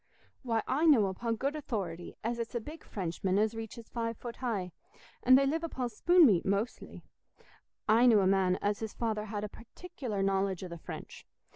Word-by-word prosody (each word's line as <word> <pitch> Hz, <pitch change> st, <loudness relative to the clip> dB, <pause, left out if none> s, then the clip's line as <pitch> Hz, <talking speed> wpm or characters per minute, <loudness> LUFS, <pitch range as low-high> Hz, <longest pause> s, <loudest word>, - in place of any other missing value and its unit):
Why, 230 Hz, -4 st, 0 dB
I 300 Hz, +6 st, +2 dB
know 255 Hz, -10 st, +6 dB
upo' 230 Hz, +5 st, -2 dB
good 275 Hz, +6 st, -2 dB
authority 190 Hz, -, -4 dB
as 235 Hz, +1 st, -2 dB
it's 230 Hz, +1 st, -4 dB
a -, -, +1 dB
big 305 Hz, +8 st, -10 dB
Frenchman 185 Hz, 0 st, -2 dB
as 215 Hz, +1 st, +2 dB
reaches 225 Hz, 0 st, -7 dB
five 230 Hz, -1 st, -3 dB
foot 240 Hz, -1 st, -7 dB
high, 210 Hz, -8 st, -2 dB, 0.5 s
an' 255 Hz, +1 st, +7 dB
they 275 Hz, +1 st, +5 dB
live 320 Hz, +4 st, 0 dB
upo' 260 Hz, -7 st, -3 dB
spoon 345 Hz, +10 st, +5 dB
meat 195 Hz, -10 st, +4 dB
mostly. 200 Hz, +5 st, -2 dB, 0.8 s
I 230 Hz, +3 st, +5 dB
knew 220 Hz, -4 st, +6 dB
a -, -, +2 dB
man 190 Hz, -1 st, +3 dB
as 205 Hz, +1 st, 0 dB
his 220 Hz, -1 st, -5 dB
father 220 Hz, -2 st, -2 dB
had 210 Hz, -1 st, -4 dB
a -, -, -2 dB
particular 240 Hz, -, -6 dB
knowledge 195 Hz, -1 st, 0 dB
o' -, -, -4 dB
the 170 Hz, -1 st, -8 dB
French. -, -, -9 dB
225 Hz, 190 wpm, -31 LUFS, 195-250 Hz, 0.8 s, an